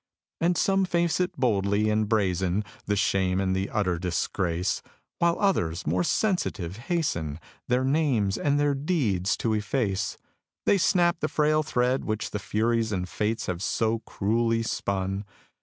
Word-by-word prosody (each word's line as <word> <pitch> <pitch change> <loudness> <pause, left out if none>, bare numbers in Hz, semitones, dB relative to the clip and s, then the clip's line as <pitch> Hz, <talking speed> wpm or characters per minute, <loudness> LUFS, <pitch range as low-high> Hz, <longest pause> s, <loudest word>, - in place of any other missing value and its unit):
And 175 +1 +2
some 195 0 +2
face 170 -1 +1
it 180 0 -1
boldly, 105 -3 +2
and 105 -1 +1
brazen 95 -2 +1 0.2
The 105 - +1
shame 95 -2 +1
and 95 -1 +1
the 95 +1 -1
utter 90 -5 0
disgrace; 90 0 -1 0.4
While 170 0 +3
others, 90 - +1
more 90 +4 +1
sensitive, 100 - 0
hasten 110 - -2 0.3
Their 125 +1 +2
names 130 -9 +1
and 145 0 +1
their 145 -1 +2
deeds 125 - 0
to 115 - 0
efface. 105 -2 -1 0.5
They 200 - +4
snap 175 -2 +3
the 155 - 0
frail 155 0 +2
thread 130 -3 0
which 110 0 -2
the 105 - -3
Furies 110 +2 0
And 90 -3 -2
Fates 110 +5 -2
have 90 -1 -3
so 110 +2 0
cruelly 115 +2 0
spun. 95 -2 -2
110 Hz, 150 wpm, -26 LUFS, 95-145 Hz, 0.5 s, They